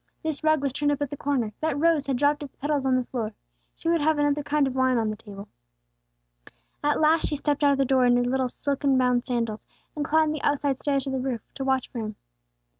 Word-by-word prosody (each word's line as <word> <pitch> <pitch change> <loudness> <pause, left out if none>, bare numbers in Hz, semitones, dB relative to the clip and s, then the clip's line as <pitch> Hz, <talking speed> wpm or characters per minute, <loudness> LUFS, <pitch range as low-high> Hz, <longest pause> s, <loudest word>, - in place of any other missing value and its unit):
This 315 -1 -3
rug 310 -2 +3
was 275 -2 -1
turned 290 +1 +1
up 290 - -1
at 285 - -5
the - - -3
corner; 265 -7 -1
that 310 -2 -1
rose 315 -2 +2
had 270 -2 0
dropped 290 +2 +2
its 285 -3 -8
petals 290 -1 -1
on 260 - +3
the 255 - +1
floor. 225 -4 -4 0.4
She - - -7
would 335 -1 +2
have 310 +1 +2
another 290 0 +1
kind 290 0 +1
of 265 - -2
wine 260 -1 +2
on 220 -2 0
the - - -4
table. 205 -1 -11 1.4
At 295 0 +2
last 315 +1 +3
she 300 - -2
stepped 290 0 -1
out 285 -1 +5
of - - -1
the 275 - +2
door 260 -1 +3
in 245 0 +4
her 245 - +2
little 255 +1 0
silken 280 0 0
bound 250 -1 +2
sandals, 230 -4 -2 0.3
and 300 - -2
climbed 310 +1 +2
the 305 - -5
outside 285 -2 0
stairs 275 -2 0
to 270 - -4
the 265 - -1
roof, 250 -3 -2
to 270 - -5
watch 265 -1 +1
for 240 - -5
him. 215 -1 -5
275 Hz, 250 wpm, -26 LUFS, 250-295 Hz, 1.4 s, out